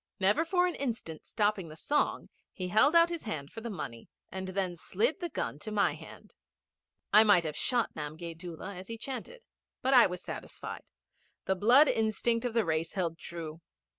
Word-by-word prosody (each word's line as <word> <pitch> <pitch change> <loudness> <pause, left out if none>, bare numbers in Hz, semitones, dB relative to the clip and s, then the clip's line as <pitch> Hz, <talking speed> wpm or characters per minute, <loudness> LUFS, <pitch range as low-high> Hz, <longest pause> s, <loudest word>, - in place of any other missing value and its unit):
Never 205 +11 +3
for 360 +1 +2
an 360 - 0
instant 230 - -5
stopping 205 -4 0
the 155 - -10
song 295 - 0 0.2
he 185 -1 -5
held 275 - +4
out 335 0 +7
his 340 -6 -5
hand 150 -10 -5
for 225 - -8
the 235 - -5
money, 115 - -7 0.2
and 190 0 -5
then 185 -2 -2
slid 215 - -1
the 345 - -3
gun 145 - -4
to 215 - -6
my 205 -1 +2
hand. - - -13 0.8
I 215 +1 +9
might 205 -5 +5
have 155 -2 -4
shot 240 +7 +1
Namgay 155 +3 -6
Doola 175 +3 -7
as 185 +1 -9
he 230 - -6
chanted. 270 - -6 0.4
But 265 +1 +2
I 245 -2 +8
was 180 -1 -6
satisfied. - - -7 0.6
The 190 - +2
blood 240 +10 +6
instinct 225 +1 +1
of 240 -2 -2
the 230 -3 +3
race 160 0 -1
held 170 -4 -2
true. 165 -1 -7
205 Hz, 190 wpm, -30 LUFS, 170-240 Hz, 0.8 s, I